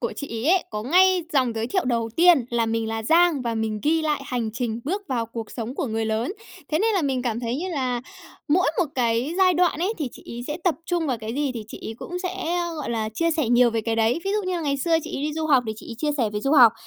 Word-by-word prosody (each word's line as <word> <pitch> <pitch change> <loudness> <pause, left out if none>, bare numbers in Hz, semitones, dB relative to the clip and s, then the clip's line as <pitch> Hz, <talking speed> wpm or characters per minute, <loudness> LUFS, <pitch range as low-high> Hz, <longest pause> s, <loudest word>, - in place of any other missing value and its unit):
của - - -2
chị 285 - -5 0.2
ấy 335 - +5
ấy 375 - +2
có 210 -1 -4
ngay 365 - +4
dòng 255 -4 +2
giới 225 0 -2
thiệu 375 +8 0
đầu 235 -2 0
tiên 340 -6 +6
là 235 -1 +1
"Mình 225 0 -1
là 225 0 -3
Giang 325 +2 +4
và 235 -2 -2
mình 220 -1 -2
ghi 320 +2 +2
lại 300 -1 0
hành 240 -3 -2
trình 235 -1 -3
bước 385 +8 -2
vào 235 -3 -1
cuộc 230 -1 -7
sống 235 +1 -5
của 275 - -2
người 225 0 -1
lớn", 220 +8 -1 0.4
thế 310 - +1
nên 445 +1 +2
là 375 - +2
mình 265 -3 0
cảm 235 -2 -2
thấy 240 +1 -2
như 355 +6 -3
là 255 -7 -1 0.5
mỗi 355 +5 +3
một 360 - +4
cái 240 +4 0
giai 370 -1 +5
đoạn 350 -2 +2
ấy 375 +5 +1
thì 295 -5 -2
chị - - -13
ấy - - -5
sẽ 295 - -3
tập 355 -4 +3
trung 345 -2 0
vào 255 -4 -1
cái 220 +1 -5
gì 285 0 0
thì 225 -2 -5
chị - - -9
ấy 225 - -5
cũng 355 - -5
sẽ, 360 -2 -2 0.2
gọi 300 -5 -4
là, 220 -2 -1
chia 335 +5 +1
sẻ 310 -6 0
nhiều 240 0 +5
về 225 0 0
cái 225 +1 -2
đấy. 225 +6 +2
Ví 390 - 0
dụ 425 - 0
như 370 - -1
là - - -3
ngày 285 -3 0
xưa 325 +4 +2
chị - - -5
ấy - - -4
đi 300 +1 -1
du 315 0 -2
học 270 -5 +4
thì 220 - -2
chị - - -11
ấy - - -5
chia 300 +3 0
sẻ 230 -5 +1
về 210 - -2
du 275 +6 0
học. 245 -7 +8
265 Hz, 295 wpm, -24 LUFS, 230-330 Hz, 0.5 s, học